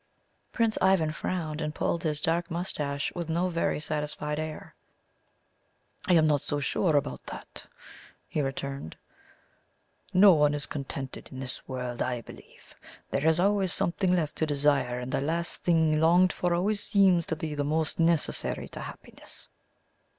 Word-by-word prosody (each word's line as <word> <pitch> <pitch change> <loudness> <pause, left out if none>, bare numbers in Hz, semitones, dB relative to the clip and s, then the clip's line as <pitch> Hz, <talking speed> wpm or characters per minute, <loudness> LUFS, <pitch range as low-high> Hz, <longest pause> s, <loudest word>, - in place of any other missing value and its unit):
Prince 230 -2 +1
Ivan 190 -5 +3
frowned 155 -1 -3
and 150 0 -3
pulled 170 - 0
his 150 -2 0
dark 165 +3 0
moustache 150 -5 -2
with 170 -2 -4
no 175 +3 +1
very 170 -3 0
satisfied 150 0 -2
air. 155 -1 -6 1.3
"I 185 - +4
am 160 -2 +5
not 145 -3 +3
so 145 - -2
sure 155 +3 +1
about 145 - -1
that," - - -9 0.6
he 150 - -1
returned. 135 - -4 1.1
"No 190 +1 +7
one 150 -2 +3
is 145 - -2
contented 135 -2 -6
in 130 - -8
this 130 -1 -6
world, 125 -2 -4
I 125 -2 -1
believe. - - -15 0.4
There 140 +3 +1
is 160 +1 +3
always 195 -1 +2
something 180 +2 +1
left 160 -4 0
to 160 - 0
desire, 140 -4 +1
and 125 +1 -5
the - - 0
last 165 +4 -2
thing 160 -3 +3
longed 175 +2 +5
for 180 - -1
always 205 +4 0
seems 190 -5 +3
the 155 -2 -2
most 155 +3 -1
necessary 165 -1 +1
to - - -8
happiness." - - -10
155 Hz, 150 wpm, -28 LUFS, 145-175 Hz, 1.3 s, No